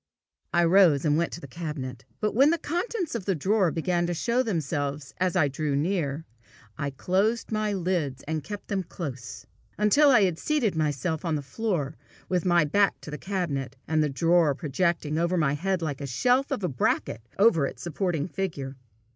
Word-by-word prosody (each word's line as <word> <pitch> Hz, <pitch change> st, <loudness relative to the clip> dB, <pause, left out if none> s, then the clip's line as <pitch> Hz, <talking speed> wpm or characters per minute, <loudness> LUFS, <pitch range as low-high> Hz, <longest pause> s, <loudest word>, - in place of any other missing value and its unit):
I 175 Hz, 0 st, +3 dB
rose, 170 Hz, -4 st, +5 dB
and 150 Hz, -1 st, +3 dB
went 170 Hz, +2 st, 0 dB
to -, -, -5 dB
the 165 Hz, -, -9 dB
cabinet. 135 Hz, -5 st, -6 dB
But 210 Hz, -, 0 dB
when 270 Hz, +7 st, +5 dB
the 335 Hz, -, +2 dB
contents 355 Hz, +3 st, -2 dB
of 230 Hz, -6 st, -4 dB
the 195 Hz, -, +1 dB
drawer 190 Hz, +4 st, +2 dB
began 175 Hz, +2 st, 0 dB
to 175 Hz, -, -2 dB
show 235 Hz, +8 st, +1 dB
themselves 145 Hz, -, -2 dB
as 185 Hz, 0 st, +1 dB
I 160 Hz, -6 st, +4 dB
drew 145 Hz, +1 st, -2 dB
near, 155 Hz, -1 st, -1 dB, 0.5 s
"I 140 Hz, -1 st, -2 dB
closed 195 Hz, -, 0 dB
my 215 Hz, -1 st, 0 dB
lids, 170 Hz, -8 st, -1 dB
and 155 Hz, -1 st, -2 dB
kept 205 Hz, +5 st, -7 dB
them 200 Hz, -2 st, -1 dB
close," 145 Hz, -8 st, -7 dB, 0.3 s
until 245 Hz, +8 st, +5 dB
I 245 Hz, -6 st, +6 dB
had 180 Hz, -4 st, 0 dB
seated 270 Hz, -, 0 dB
myself 155 Hz, +1 st, -1 dB
on 165 Hz, -3 st, 0 dB
the 145 Hz, -, -3 dB
floor, 160 Hz, -3 st, -2 dB, 0.3 s
with 180 Hz, -1 st, 0 dB
my 175 Hz, -3 st, +4 dB
back 200 Hz, +6 st, +2 dB
to 150 Hz, -, -9 dB
the 150 Hz, -, -5 dB
cabinet, 150 Hz, -9 st, -3 dB
and 160 Hz, -1 st, +2 dB
the 150 Hz, -, +1 dB
drawer 165 Hz, +1 st, +3 dB
projecting 155 Hz, 0 st, -1 dB
over 170 Hz, +2 st, +1 dB
my 150 Hz, -4 st, +2 dB
head 185 Hz, +3 st, -1 dB
like 145 Hz, -4 st, -3 dB
the 140 Hz, -, -4 dB
shelf 250 Hz, -, +2 dB
of 265 Hz, -8 st, -2 dB
a -, -, +2 dB
bracket 125 Hz, -4 st, -1 dB, 0.2 s
over 175 Hz, -9 st, +4 dB
its -, -, -9 dB
supporting 170 Hz, -2 st, -1 dB
figure. 155 Hz, -8 st, -4 dB
170 Hz, 190 wpm, -27 LUFS, 145-195 Hz, 0.5 s, I